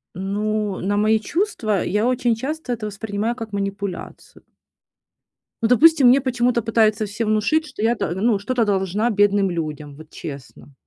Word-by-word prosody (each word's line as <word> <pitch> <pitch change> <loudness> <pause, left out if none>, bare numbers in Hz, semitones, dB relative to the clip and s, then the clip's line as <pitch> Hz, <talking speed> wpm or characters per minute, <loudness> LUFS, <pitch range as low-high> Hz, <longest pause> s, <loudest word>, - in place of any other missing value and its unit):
Ну, 205 +1 -2
на 205 +2 0
мои 215 +1 +3
чувства- 220 - -1
я 210 +2 0
очень 245 -2 +1
часто 270 +2 -4
это 225 -2 -5
воспринимаю 210 +2 -3
как 225 -3 -8
манипуляцию. 200 -1 -6 1.2
Ну, 225 - +2
допустим, 285 +3 +6
мне 265 +3 +5
почему-то 245 -2 +1
пытаются 220 -1 +2
все 210 +3 -4
внушить, 215 +9 +1
что 285 -8 -9
я 230 +2 +2
т 200 -5 -3
ну, 210 +4 +1
что-то 230 +4 -1
должна 200 +2 0
бедным 205 -2 +2
людям, 150 -4 -5
вот 155 +1 -14
честно. 140 -1 -10
215 Hz, 155 wpm, -21 LUFS, 200-240 Hz, 1.2 s, допустим